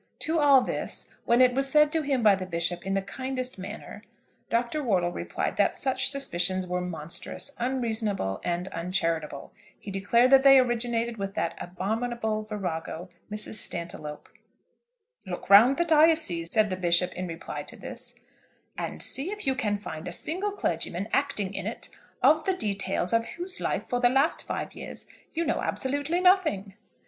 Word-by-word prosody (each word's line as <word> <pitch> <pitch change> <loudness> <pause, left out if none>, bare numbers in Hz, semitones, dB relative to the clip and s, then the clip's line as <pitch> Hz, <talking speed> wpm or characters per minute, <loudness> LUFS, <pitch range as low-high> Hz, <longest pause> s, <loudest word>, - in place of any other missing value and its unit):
To 325 0 0
all 280 -3 +6
this, - - -3
when 235 +2 +4
it 250 -1 +6
was 270 +1 +2
said 300 0 +5
to 320 - +1
him 275 -5 0
by 210 -2 +7
the 190 -1 -3
Bishop 175 +1 -2
in 195 - 0
the 195 - 0
kindest 255 +3 -4
manner, 200 +3 -8 0.5
Dr. 240 +6 0
Wortle 185 -9 +1
replied - - -3
that - - +3
such 260 -1 +1
suspicions 185 -9 0
were 180 0 -2
monstrous, 170 - -3
unreasonable, 225 - -1
and 175 +1 -2
uncharitable. 165 -4 -2 0.3
He 200 - -8
declared 235 +6 +3
that 270 -1 +8
they 270 0 +8
originated 235 -2 +1
with 195 -1 -4
that 165 - -1
abominable 220 +4 -2
virago, 180 -4 -5 0.2
Mrs. 215 +1 0
Stantiloup. 155 -3 -4 1.0
"Look 185 +1 -6
round 235 +7 +8
the 345 - +2
diocese," 310 - +3
said 215 -2 +3
the - - 0
Bishop 180 0 +2
in 180 0 -4
reply 165 -1 -6
to - - -10
this, - - -7 0.6
"and - - -3
see 280 +7 0
if 420 +1 -6
you 265 - +3
can 215 -6 -1
find 160 -6 -7
a - - -4
single 365 - -1
clergyman 180 - -2
acting 245 -9 0
in - - -4
it, - - -6 0.3
of 310 +1 +5
the 380 -1 +1
details 195 - -1
of 230 0 +2
whose 370 +3 -5
life - - -1
for 245 - -1
the 245 -1 +5
last 270 +5 +1
five - - -4
years - - -7 0.3
you 335 +1 -1
know - - 0
absolutely 285 +5 -1
nothing." 345 - +3
220 Hz, 170 wpm, -27 LUFS, 180-270 Hz, 1.0 s, that